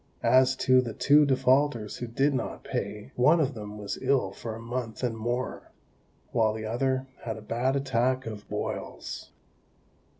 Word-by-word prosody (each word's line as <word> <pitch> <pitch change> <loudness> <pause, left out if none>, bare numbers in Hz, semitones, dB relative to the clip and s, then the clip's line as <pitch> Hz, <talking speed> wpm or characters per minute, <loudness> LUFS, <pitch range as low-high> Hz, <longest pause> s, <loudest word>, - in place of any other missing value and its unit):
As 130 0 +5
to 130 -1 +4
the 115 -3 -5
two 145 +1 +5
defaulters 130 -4 +2
who 120 - -5
did 135 +5 +1
not 125 -4 -3
pay, 105 +1 -4
one 150 +7 +5
of 145 -2 +1
them 105 -2 -7
was 105 -1 -5
ill 130 -7 +2
for 110 +2 -6
a - - -8
month 115 0 -5
and 120 -2 0
more; 120 +3 -3 0.6
while 110 -3 +2
the 110 0 -5
other 130 +4 0 0.2
had 115 -1 -3
a - - -9
bad 120 +5 0
attack 130 -1 +1
of 105 -2 -7
boils. - - -5
125 Hz, 165 wpm, -28 LUFS, 110-130 Hz, 0.6 s, As